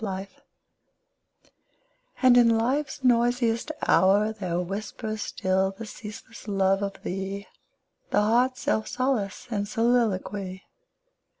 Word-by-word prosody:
25 195 Hz, -1 st, -5 dB, 1.8 s
And 255 Hz, -1 st, +7 dB
in 230 Hz, -2 st, +5 dB
Life's 265 Hz, +4 st, -1 dB
noisiest 240 Hz, +1 st, +2 dB, 0.2 s
hour 205 Hz, +3 st, +4 dB
There 180 Hz, -5 st, -2 dB
whispers 215 Hz, +4 st, -4 dB
still 190 Hz, -1 st, 0 dB
the 225 Hz, -, -6 dB
ceaseless 215 Hz, +1 st, -10 dB
love 195 Hz, -1 st, +2 dB
of 200 Hz, -1 st, -4 dB
thee, 195 Hz, +2 st, -4 dB, 0.6 s
The -, -, +3 dB
heart's 245 Hz, +4 st, +2 dB
self 220 Hz, -, 0 dB
solace 255 Hz, -7 st, -1 dB
} -, -, -20 dB
and 205 Hz, -2 st, -1 dB
soliloquy. 205 Hz, -5 st, 0 dB
215 Hz, 110 wpm, -26 LUFS, 195-235 Hz, 1.8 s, And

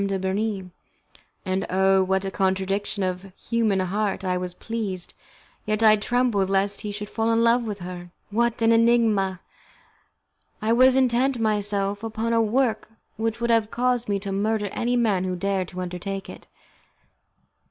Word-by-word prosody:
de 195 Hz, -1 st, -1 dB
Bernis, 190 Hz, +1 st, -2 dB, 0.8 s
and, 190 Hz, +1 st, -1 dB
oh! 190 Hz, +1 st, +3 dB
what 190 Hz, +1 st, 0 dB
a 195 Hz, -, -3 dB
contradiction 195 Hz, +1 st, -1 dB
of 185 Hz, -1 st, -2 dB
the 195 Hz, -, -13 dB
human 225 Hz, -4 st, 0 dB
heart! 195 Hz, +1 st, -1 dB
I 180 Hz, 0 st, 0 dB
was 180 Hz, 0 st, -4 dB
pleased, 205 Hz, -6 st, -4 dB, 0.5 s
yet 215 Hz, +1 st, -1 dB
I 215 Hz, -1 st, +7 dB
trembled 215 Hz, -3 st, +1 dB
lest 195 Hz, +1 st, +1 dB
he 210 Hz, -, -4 dB
should 210 Hz, 0 st, -6 dB
fall 225 Hz, +2 st, -1 dB
in 230 Hz, 0 st, +3 dB
love 235 Hz, +1 st, +4 dB
with 205 Hz, -3 st, -5 dB
her! 175 Hz, 0 st, -7 dB, 0.2 s
What 235 Hz, +1 st, 0 dB
an 225 Hz, -, +5 dB
enigma! 225 Hz, -5 st, +3 dB, 1.2 s
I 220 Hz, +1 st, +1 dB
was 255 Hz, +2 st, +5 dB
intent 260 Hz, 0 st, +2 dB
myself 205 Hz, -2 st, 0 dB
upon 225 Hz, +1 st, -2 dB
a 230 Hz, -, +4 dB
work 225 Hz, 0 st, 0 dB, 0.3 s
which 225 Hz, +1 st, -2 dB
would 235 Hz, 0 st, 0 dB
have 225 Hz, -2 st, +2 dB
caused 245 Hz, -1 st, 0 dB
me 200 Hz, -, +1 dB
to 200 Hz, -1 st, -4 dB
murder 205 Hz, +1 st, 0 dB
any 245 Hz, +1 st, -1 dB
man 210 Hz, -6 st, +1 dB
who 185 Hz, -1 st, -2 dB
dared 190 Hz, 0 st, -1 dB
to 185 Hz, 0 st, -6 dB
undertake 185 Hz, +2 st, -5 dB
it. -, -, -13 dB
205 Hz, 165 wpm, -24 LUFS, 190-230 Hz, 1.2 s, I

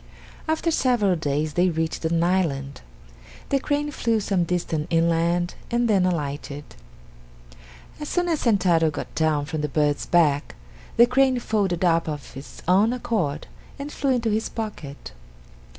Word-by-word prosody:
After 320 Hz, +1 st, 0 dB
several 240 Hz, -, +2 dB
days 150 Hz, -1 st, -1 dB
they 180 Hz, +1 st, +3 dB
reached 160 Hz, 0 st, -2 dB
an 165 Hz, +1 st, +1 dB
island. 145 Hz, -7 st, 0 dB, 0.7 s
The 275 Hz, -, +2 dB
crane 290 Hz, +2 st, -1 dB
flew 230 Hz, -5 st, 0 dB
some 195 Hz, -4 st, 0 dB
distance 165 Hz, -3 st, -2 dB
inland 170 Hz, +1 st, +1 dB, 0.2 s
and 240 Hz, 0 st, +1 dB
then 195 Hz, -4 st, +3 dB
alighted. 145 Hz, -3 st, -3 dB, 1.4 s
As 300 Hz, -, -5 dB
soon 355 Hz, 0 st, 0 dB
as 325 Hz, -3 st, 0 dB
Sentaro 180 Hz, -8 st, +3 dB
got 150 Hz, -, -6 dB
down 155 Hz, -2 st, +1 dB
from 155 Hz, +1 st, -4 dB
the 150 Hz, -, -2 dB
bird's 145 Hz, 0 st, 0 dB
back, 150 Hz, -5 st, +2 dB, 0.4 s
the 235 Hz, -, +8 dB
crane 260 Hz, +1 st, +3 dB
folded 195 Hz, -7 st, 0 dB
up 165 Hz, -2 st, +2 dB
of 145 Hz, -3 st, -7 dB
its 135 Hz, +2 st, -10 dB
own 200 Hz, +6 st, +4 dB
accord 190 Hz, -, -2 dB, 0.3 s
and 285 Hz, +1 st, -6 dB
flew 280 Hz, -, -2 dB
into 230 Hz, -3 st, 0 dB
his 220 Hz, +1 st, -1 dB
pocket. 185 Hz, -, -7 dB
175 Hz, 150 wpm, -24 LUFS, 155-230 Hz, 1.4 s, the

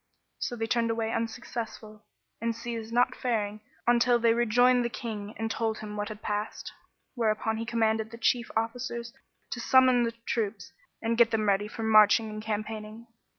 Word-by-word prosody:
So 245 Hz, -, -2 dB
they 225 Hz, -1 st, -2 dB
turned 230 Hz, 0 st, +1 dB
away 225 Hz, 0 st, -1 dB
unsuccessful 225 Hz, -1 st, -5 dB, 0.4 s
and 230 Hz, 0 st, -1 dB
ceased 230 Hz, -1 st, -5 dB
not 245 Hz, +1 st, +3 dB
faring 215 Hz, -4 st, -2 dB, 0.3 s
on 240 Hz, 0 st, +5 dB
till 245 Hz, 0 st, +4 dB
they 230 Hz, -1 st, +3 dB
rejoined 245 Hz, +2 st, +4 dB
the 235 Hz, -, -1 dB
King 215 Hz, -3 st, -6 dB
and 225 Hz, 0 st, -2 dB
told 225 Hz, -1 st, -1 dB
him 210 Hz, -1 st, -7 dB
what 205 Hz, 0 st, -3 dB
had 215 Hz, 0 st, -9 dB
passed; 210 Hz, +1 st, -3 dB, 0.4 s
whereupon 220 Hz, -2 st, 0 dB
he 230 Hz, +1 st, -4 dB
commanded 220 Hz, -1 st, +1 dB
the 230 Hz, -, -10 dB
chief 235 Hz, +1 st, +1 dB
officers 235 Hz, +1 st, -3 dB, 0.4 s
to 245 Hz, -, -3 dB
summon 255 Hz, 0 st, +5 dB
the 230 Hz, -1 st, 0 dB
troops 215 Hz, -4 st, -2 dB, 0.3 s
and 230 Hz, +1 st, 0 dB
get 235 Hz, -1 st, +6 dB
them 215 Hz, -2 st, 0 dB
ready 200 Hz, +1 st, +2 dB
for 225 Hz, +1 st, -6 dB
marching 215 Hz, 0 st, +5 dB
and 215 Hz, 0 st, -6 dB
campaigning. 215 Hz, +1 st, -5 dB
225 Hz, 175 wpm, -28 LUFS, 215-235 Hz, 0.4 s, get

